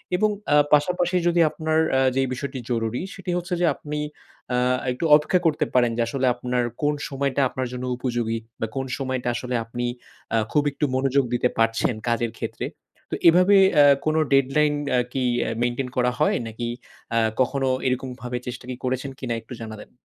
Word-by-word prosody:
এবং 215 +3 +3 0.2
এ্যাঁ 145 0 +5
পাশাপাশি 175 +4 +2
যদি 175 0 +2
আপনার 160 0 0
এ্যাঁ 130 0 +4
যে 135 - +3
বিষয়টি 130 0 -5
জরুরি 115 +2 -1
সেটি 185 -2 -5
হচ্ছে 175 0 -4
যে - - +4
আপনি 150 0 -5 0.5
এ্যাঁ 125 +1 +2
একটু 125 +7 -3
অপেক্ষা 155 +4 +2
করতে 155 -1 +2
পারেন 120 -2 +4
যে - - +1
আসলে 135 -1 -1
আপনার 125 0 -1 0.2
কোন 150 0 +2 0.2
সময়টা 140 0 -1
আপনার 130 -1 -3
জন্য 125 0 -4
উপযোগী 120 -3 -1 0.2
বা 115 - -1
কোন 135 0 -2
সময়টা 130 -2 -3
আসলে 125 0 -3
আপনি 120 +1 -4 0.5
এ্যাঁ 110 -1 +2
খুব 150 -1 +3
একটু 150 - -1
মনোযোগ 135 +1 +2
দিতে 125 0 +2
পারছেন 115 +1 +2
কাজের 115 -1 0
ক্ষেত্রে। - - -4 0.4
তো - - -2
এভাবে 180 +4 +6 0.2
এ্যাঁ 145 -1 +7
কোন 155 0 +1 0.2
ডেডলাইন 145 +2 +3 0.2
এ্যাঁ 125 -1 +2
কি 130 -2 0 0.2
এ - - -2
মেইনটেইন 120 +1 -1
করা 125 0 +3
হয়? - - +3
নাকি 115 +2 -5 0.4
এ্যাঁ 115 -1 +2
কখনো 135 +1 +1 0.2
এরকম 130 +1 -1
ভাবে 125 0 -3
চেষ্টা 125 0 -6 0.2
করেছেন 130 +2 -2
কিনা 120 -3 -3
একটু 115 - -11
জানাবেন? 110 -1 -8
130 Hz, 180 wpm, -24 LUFS, 120-150 Hz, 0.5 s, এ্যাঁ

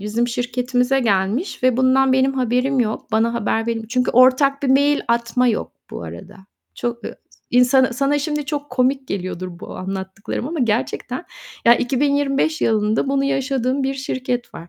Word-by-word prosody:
bizim 220 +4 -1
şirketimize 250 +2 0
gelmiş 215 - 0
ve 255 -2 +3
bundan 260 +1 +3
benim 265 +1 +2
haberim 255 +1 +1
yok, 220 -2 -3
bana 225 +2 +2
haber 225 0 -1
veril 225 -1 -3
Çünkü 250 +1 0
ortak 265 +3 +4
bir 275 - 0
mail 285 +2 +3
atma 235 +2 +1
yok 220 - -2 0.2
bu - - -7
arada. 85 - -10 0.4
Çok, 235 0 -4
eee - - -6 0.3
insana 250 +1 +4
sana 275 +4 +1
şimdi 295 0 -2
çok 290 -1 -4
komik 265 +1 0
geliyordur 185 -1 -4
bu - - -8
anlattıklarım 190 +5 -5
ama 325 0 -4
gerçekten 230 -2 -2 0.4
ya, 235 - +7
2025 280 +3 0
yılında 220 +3 +1
bunu 275 0 +1
yaşadığım 270 -1 0
bir 270 +1 -1
şirket 255 -2 -4
var. 170 - -10
250 Hz, 160 wpm, -20 LUFS, 230-270 Hz, 0.4 s, ya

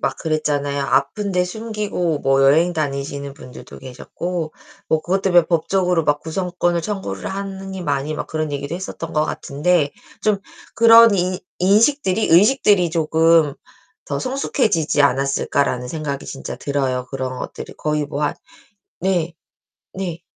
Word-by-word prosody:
막 - - -1
그랬잖아요. 145 -3 -1
아픈데 180 +8 +1
숨기고 205 -6 -3
뭐 135 0 +3
여행 160 +6 +4
다니시는 140 -2 -3
분들도 125 - -12
계셨고 155 +6 -5 0.4
뭐 160 - +2
그것 190 +2 0
때문에 175 -3 +5
법적으로 180 0 +1
막 145 0 +1
구성권을 175 0 -1
청구를 200 +2 -4
하느니 195 -1 -5
마니 145 -1 -1
막 150 - -4
그런 155 -1 -3
얘기도 140 +2 -4
했었던 175 -2 -6
것 155 0 +2
같은데 150 +1 0 0.3
좀 210 -2 +2 0.4
그런 230 -1 +8
'인 180 -1 0 0.2
인식들이 215 +2 +3
의식들이 200 0 +4
쪼금 160 -1 +3 0.5
더 - - -2
성숙해지지 215 - 0
않았을까.'라는 140 -2 +1
생각이 145 -2 -4
진짜 135 - -7
들어요. 130 -3 -2
그런 130 -1 -4
것들이 - - -7
거의 150 -1 -1
뭐 145 0 -4
한 145 - 0 0.7
네. 175 -3 0 0.6
네. 175 -3 -4
165 Hz, 310 characters per minute, -20 LUFS, 145-190 Hz, 0.7 s, 그런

